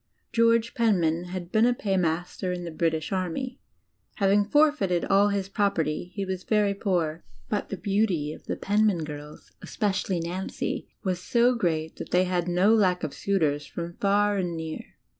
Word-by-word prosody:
George 230 0 +3
Penman 175 -7 +2
had 180 -1 -6
been 220 +2 +4
a 245 - +2
paymaster 180 -3 -1
in 180 -1 -4
the 170 - -5
British 160 +1 -1
Army; 195 +8 -3 0.6
having 200 0 +3
forfeited 290 - +2
all 200 +1 +4
his 200 -2 -1
property, 180 -5 -1
he 200 -1 -2
was 185 -1 -4
very 210 -2 +2
poor, 175 -5 -1 0.3
but 210 - -2
the 195 - -4
beauty 190 -7 0
of - - -14
the - - -1
Penman 205 -4 +1
girls, 150 0 -9
especially 190 -3 -1
Nancy, 175 +3 -4
was 185 -3 -1
so 240 +5 +3
great 160 -8 -1
that - - -7
they 180 +1 +3
had 180 -1 -1
no 180 +5 +4
lack 185 -5 +3
of 155 - -3
suitors 150 -7 0
from 170 +2 -6
far 205 +1 +2
and 175 -3 -2
near. 160 -1 -5
185 Hz, 165 wpm, -26 LUFS, 170-205 Hz, 0.6 s, been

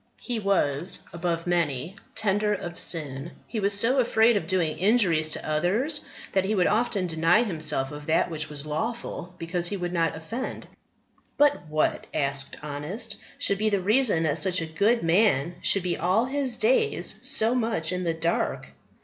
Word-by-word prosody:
He 240 -3 -3
was, 185 -3 0
above 170 -1 -2
many, 170 -1 0 0.2
tender 210 -1 +1
of 175 -3 -6
sin; 150 -1 -2
he 225 - -4
was 200 0 +2
so 250 +5 +3
afraid 230 -1 +4
of 170 -6 -1
doing 170 -4 0
injuries 185 -7 +3
to - - -4
others 200 - +1 0.3
that 190 - +2
he 210 +3 0
would 180 -3 +3
often 215 -3 +1
deny 165 +6 +3
himself 155 - 0
of 150 0 -9
that 160 +2 +2
which 155 -1 -2
was 150 -1 -4
lawful 180 +2 -4
because 175 +1 -1
he 200 - -3
would 175 -1 -4
not 165 -2 +1
offend." 225 +11 -6 0.7
"But 290 - +3
what," 155 0 0
asked 140 -1 -2
Honest, 150 - -5 0.2
"should 200 - +1
be 215 0 +2
the 200 -2 +1
reason 210 -3 +3
that 155 0 +1
such 185 +3 +2
a 165 - -2
good 205 +9 +1
man 170 -3 +3
should 195 - +4
be 180 -1 -1
all 185 +7 +2
his 265 -2 -1
days 450 -1 +2
so 225 +2 +1
much 225 -10 0
in 180 0 -2
the 165 -2 -1
dark?" 165 +1 -1
180 Hz, 175 wpm, -26 LUFS, 160-220 Hz, 0.7 s, afraid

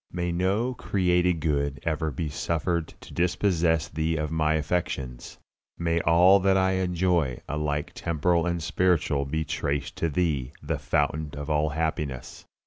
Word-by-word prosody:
May 85 0 -2
no 100 +8 0
created 90 -6 +1
good 70 -2 0
ever 80 -1 -1
be 75 +3 -3
suffered 85 +2 -1
to - - -12
dispossess 85 -3 +1
Thee 80 +2 -1
of 75 0 -2
my 80 -1 +2
affections. 75 -6 -3 0.4
May 85 0 0
all 90 +5 +6
that 95 0 +3
I 95 0 +3
enjoy, 90 -7 +1
alike 75 -1 -2
temporal 85 +1 0
and 85 -2 -1
spiritual, 85 -5 +1
be 80 +3 -2
traced 70 -2 -2
to 85 - 0
Thee, 75 -6 -1
the - - -2
Fountain 75 +1 0
of 75 +1 -4
all 75 0 +2
happiness. 75 -4 -3
80 Hz, 145 wpm, -26 LUFS, 75-90 Hz, 0.4 s, all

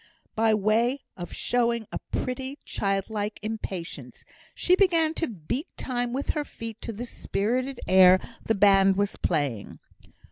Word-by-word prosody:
By 220 0 +3
way 225 +6 +1
of 175 -1 -7
showing 235 -2 0
a - - -3
pretty, 260 +2 -3
childlike 205 +1 -2
impatience, 200 -5 -6 0.3
she 365 - +3
began 335 -5 +3
to 325 0 -1
beat 235 - -4
time 245 -2 -2
with 270 +3 -3
her 300 - -2
feet 230 -5 -8
to - - -4
the 230 +3 -6
spirited 250 +4 -2
air 185 0 +7 0.2
the 225 - +1
band 195 -1 +5
was 200 +1 0
playing. 140 - -2
225 Hz, 140 wpm, -26 LUFS, 195-255 Hz, 0.3 s, air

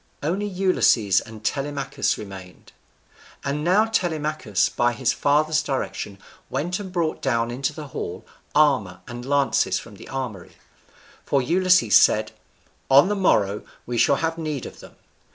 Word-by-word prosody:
Only 190 +7 -1
Ulysses 180 - +2
and 110 -1 -12
Telemachus 140 -1 -1
remained. 95 -3 -11 0.7
And 145 +2 -2
now 190 +6 +4
Telemachus, 155 - 0
by 120 0 0
his 130 0 0
father's 155 +2 +2
direction, 135 -8 -4 0.3
went 170 +8 -2
and 195 -2 -7
brought 170 -3 -1
down 115 -3 0
into 130 +2 -2
the 150 -3 -9
hall 90 -7 -6 0.3
armour 130 -12 +2
and 120 +1 -7
lances 140 +1 +1
from - - -10
the - - -12
armoury; 125 -9 -5 0.7
for 140 - +1
Ulysses 180 - +3
said, 110 0 +3 0.6
"On 140 +7 +6
the 210 - 0
morrow 105 - +2 0.2
we 120 -1 -2
shall 140 - +4
have 165 +2 -2
need 155 -5 -3
of - - -10
them." - - -14
140 Hz, 145 wpm, -23 LUFS, 115-165 Hz, 0.7 s, On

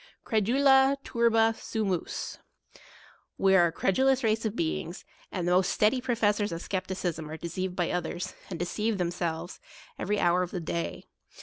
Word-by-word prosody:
Credula 265 +5 +4
turba 225 -1 +3
sumus 200 -8 -3 1.0
We 195 0 +4
are 175 -2 +6
a - - -3
credulous 265 +10 +2
race 220 0 +1
of 220 0 -1
beings; 170 0 -3 0.3
and 180 -3 -2
the - - +2
most 185 +1 +3
steady 220 +5 +2
profes 225 -5 +1
sors 205 -1 -1
of 165 +1 -5
skepticism 185 -4 -3
are 160 - -6
deceived 180 +2 -4
by 175 -2 0
others, 180 0 -3 0.2
and 180 - -4
deceive 210 +5 -1
themselves, 170 -1 -3 0.4
every 205 +2 0
hour 175 +1 +3
of 180 - -2
the 180 - -4
day. 170 0 -4
190 Hz, 160 wpm, -28 LUFS, 175-225 Hz, 1.0 s, are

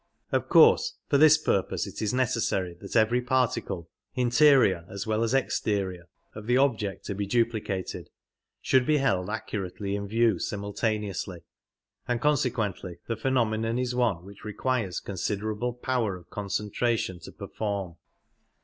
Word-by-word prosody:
Of - - 0
course 465 0 +6
for 140 - +4
this 155 0 +8
purpose 100 -11 0
it - - -8
is 105 -2 0
necessary 115 -8 0
that 100 - -8
every 115 +2 +4
particle, 125 -9 -1 0.3
interior 125 - +4
as 100 0 -5
well 110 0 0
as 115 +3 +1
exterior, 100 -8 -1 0.3
of 105 0 -9
the 125 +1 +3
object 115 -8 0
to - - -3
be 100 +1 -3
duplicated 110 -4 -1 0.5
should 130 -2 +3
be 155 - +4
held 95 -9 +1
accurately 100 -2 -4
in 100 0 -4
view 110 -3 +2
simultaneously, 100 -3 -3 0.7
and 120 -1 0
consequently 115 - 0
the 115 - -1
phenomenon 115 -2 0
is 125 -1 -1
one 115 -9 0
which 100 0 -13
requires 105 -3 -2
considerable 105 +4 -3
power 125 -5 -1
of 85 -3 -18
concentration 105 -1 -1
to - - -11
perform. 100 -5 -4
110 Hz, 140 wpm, -27 LUFS, 100-125 Hz, 0.7 s, this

